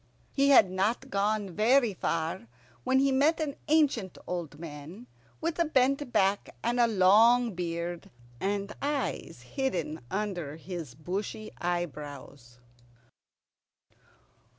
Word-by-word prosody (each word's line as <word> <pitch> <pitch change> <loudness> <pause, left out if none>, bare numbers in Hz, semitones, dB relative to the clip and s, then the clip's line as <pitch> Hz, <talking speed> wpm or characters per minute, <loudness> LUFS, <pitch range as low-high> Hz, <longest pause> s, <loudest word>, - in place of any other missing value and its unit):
He 275 0 +2
had 215 -9 +7
not 215 +8 -1
gone 205 0 0
very 230 +4 +3
far 165 -8 -2 0.4
when 260 - +2
he 275 +1 +3
met 285 +5 +3
an 295 -3 -2
ancient 285 - +2
old 170 -5 -5
man 160 +7 -9 0.3
with 330 +1 -2
a 340 - +4
bent 275 -2 +1
back, 195 -1 +1
and 240 +1 0
a 240 - +5
long 225 +4 +5
beard, 170 -1 -4 0.3
and 200 +1 -2
eyes 290 0 -3
hidden 180 - -2
under 185 -8 -3
his 165 -6 -7
bushy 195 +7 -5
eyebrows. 145 -7 -5
200 Hz, 115 wpm, -29 LUFS, 170-255 Hz, 0.4 s, had